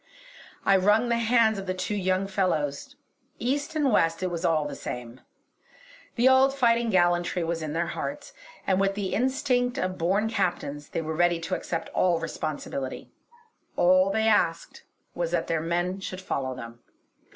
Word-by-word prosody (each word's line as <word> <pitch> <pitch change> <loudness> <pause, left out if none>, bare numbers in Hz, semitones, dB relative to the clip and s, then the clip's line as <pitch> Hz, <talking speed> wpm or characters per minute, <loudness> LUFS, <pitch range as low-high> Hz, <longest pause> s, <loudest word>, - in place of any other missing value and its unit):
I 195 - +5
wrung 210 +5 +3
the 235 0 +1
hands 225 -2 +3
of 195 - -7
the 185 - -1
two 185 +3 -3
young 190 -1 0
fellows. 170 -8 -1 0.4
East 285 +5 -2
and 290 -4 +2
West, 165 -3 +2
it 185 - -1
was 170 0 -4
all 160 -3 +2
the 145 - -6
same! 125 -1 -7 0.9
The 245 +2 +4
old 265 +1 +5
fighting 235 -3 +2
gallantry 175 -2 +2
was 165 0 -2
in 155 -1 -4
their 170 +1 0
hearts; 285 +11 -5 0.3
and 190 -1 +2
with 195 0 +1
the 200 -2 -3
instinct 250 0 +1
of 185 -3 -2
born 195 +6 +1
Captains 150 -8 -2
they 165 - -3
were 160 0 -3
ready 175 0 +2
to 175 +3 -4
accept 165 -2 -3
all 175 -2 +2
responsibility. 150 -4 -5 0.6
All 185 +2 +4
they 220 +2 +1
asked 170 -6 +1 0.3
was 170 -1 -2
that 170 -1 0
their 165 -1 -1
men 175 +3 -1
should 185 -1 -6
follow 130 -8 -3
them. 115 -1 -9
185 Hz, 170 wpm, -26 LUFS, 165-220 Hz, 0.9 s, I